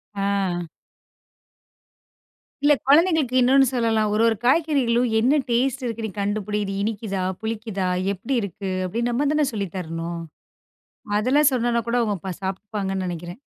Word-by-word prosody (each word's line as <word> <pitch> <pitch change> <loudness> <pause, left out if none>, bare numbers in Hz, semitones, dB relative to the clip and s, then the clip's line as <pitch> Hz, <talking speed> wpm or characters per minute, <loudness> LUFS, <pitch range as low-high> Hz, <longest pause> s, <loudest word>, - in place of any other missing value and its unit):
ஆ. 195 -3 -1 2.0
இல்ல 295 0 +6
குழந்தைகளுக்கு 305 -3 +4
இன்னொன்னு 265 +2 +5
சொல்லலாம், 225 -4 +1
ஒரு 215 - +2
ஒரு 225 - +2
காய்கறிகளும் 255 -5 +2
என்ன 265 +7 +3
டெஸ்ட் 260 +3 +1
இருக்குன்னு 225 -2 -3
கண்டுபிடி? 205 +1 -1
இது 195 -1 -4
இனிக்குதா, 205 -3 -2 0.2
புளிக்குதா, 220 -3 -3 0.3
எப்படி 215 +8 -4
இருக்கு 195 -1 -5 0.2
அப்டி 225 +6 -3
நம்ம 255 +5 0
தான 300 -2 +2
சொல்லித் 200 -4 -4
தரணும். 165 -1 -4 1.0
அதெல்லாம் 275 +7 +4
சொன்னனா 240 -1 +1
கூட 235 - +1
அவுங்க 195 -4 -2
சாப்பிடுப்பாங்கன்னு 195 0 -3
நெனைக்கிறேன். 175 +4 -6
220 Hz, 125 wpm, -23 LUFS, 195-250 Hz, 2.0 s, இல்ல